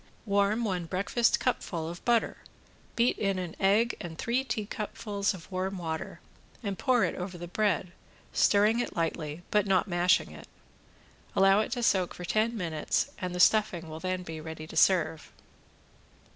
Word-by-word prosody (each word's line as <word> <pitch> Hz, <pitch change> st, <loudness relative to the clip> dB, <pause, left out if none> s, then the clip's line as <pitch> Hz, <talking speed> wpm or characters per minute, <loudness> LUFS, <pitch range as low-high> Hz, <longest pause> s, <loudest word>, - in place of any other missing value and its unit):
Warm 200 Hz, +2 st, +2 dB
one 180 Hz, -6 st, -2 dB
breakfast 200 Hz, +7 st, +1 dB
cupful 170 Hz, -10 st, -2 dB
of 170 Hz, +1 st, -8 dB
butter, 235 Hz, -2 st, +2 dB, 0.6 s
beat 235 Hz, +1 st, +2 dB
in 195 Hz, -2 st, 0 dB
an 180 Hz, -3 st, -5 dB
egg 210 Hz, +5 st, +3 dB
and 170 Hz, -4 st, -7 dB
three 245 Hz, +6 st, 0 dB
teacupfuls 210 Hz, -3 st, -3 dB
of 180 Hz, +1 st, -13 dB
warm 190 Hz, +1 st, -2 dB
water 160 Hz, -2 st, -5 dB, 0.4 s
and 200 Hz, -2 st, -2 dB
pour 255 Hz, -3 st, +3 dB
it -, -, 0 dB
over 180 Hz, 0 st, -6 dB
the 175 Hz, 0 st, -7 dB
bread, 185 Hz, -2 st, 0 dB, 0.4 s
stirring 210 Hz, +3 st, +4 dB
it 245 Hz, -, -3 dB
lightly, 165 Hz, -1 st, -2 dB
but 210 Hz, -1 st, +2 dB
not 195 Hz, +1 st, +2 dB
mashing 175 Hz, -, +2 dB
it. 75 Hz, -1 st, -12 dB, 0.9 s
Allow 195 Hz, +1 st, +5 dB
it 220 Hz, -, -1 dB
to 245 Hz, -2 st, -3 dB
soak 190 Hz, -5 st, +2 dB
for 180 Hz, -, -7 dB
ten 220 Hz, +5 st, +1 dB
minutes 165 Hz, -5 st, -1 dB
and 180 Hz, -1 st, -4 dB
the -, -, -3 dB
stuffing 180 Hz, -5 st, +3 dB
will 155 Hz, 0 st, -7 dB
then 185 Hz, +1 st, -2 dB
be 160 Hz, -2 st, -7 dB
ready 160 Hz, 0 st, -7 dB
to 160 Hz, -, -11 dB
serve. 160 Hz, -2 st, +2 dB
190 Hz, 165 wpm, -29 LUFS, 170-210 Hz, 0.9 s, Allow